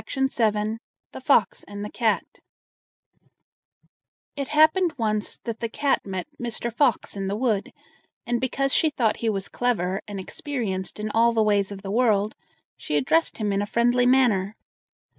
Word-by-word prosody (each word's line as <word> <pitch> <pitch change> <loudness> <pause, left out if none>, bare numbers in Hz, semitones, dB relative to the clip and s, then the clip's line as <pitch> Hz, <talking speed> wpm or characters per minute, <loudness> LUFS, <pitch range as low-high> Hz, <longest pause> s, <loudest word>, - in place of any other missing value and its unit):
THE 225 -5 0 0.4
FOX 245 -9 +2
AND 205 0 -7
THE 210 - -7
CAT 225 -3 +1 2.1
It 280 -1 -3
happened 315 +4 +4
once 215 -3 -1
that 230 -2 -6
the 230 - -3
cat 280 +4 0
met 190 -3 -4 0.2
Mr. 235 0 -3
Fox 245 -5 +1
in 195 -1 -3
the 200 - -1
wood, 220 -3 0 0.5
and 240 0 -1
because 275 +1 0
she 315 - +3
thought 235 -7 0
he 230 - -1
was 195 -2 -2
clever 195 -6 -1
and 205 -2 -6
experienced 205 -4 -4
in 210 0 -3
all 230 +2 +3
the 225 -1 +3
ways 205 -2 +1
of 195 0 -8
the 195 - -4
world, 215 -3 +2 0.4
she 150 - -2
addressed 325 - +2
him 210 -3 -1
in 195 - +1
a 205 - -2
friendly 240 +2 +2
manner. 225 -6 +3
225 Hz, 160 wpm, -24 LUFS, 205-250 Hz, 2.1 s, happened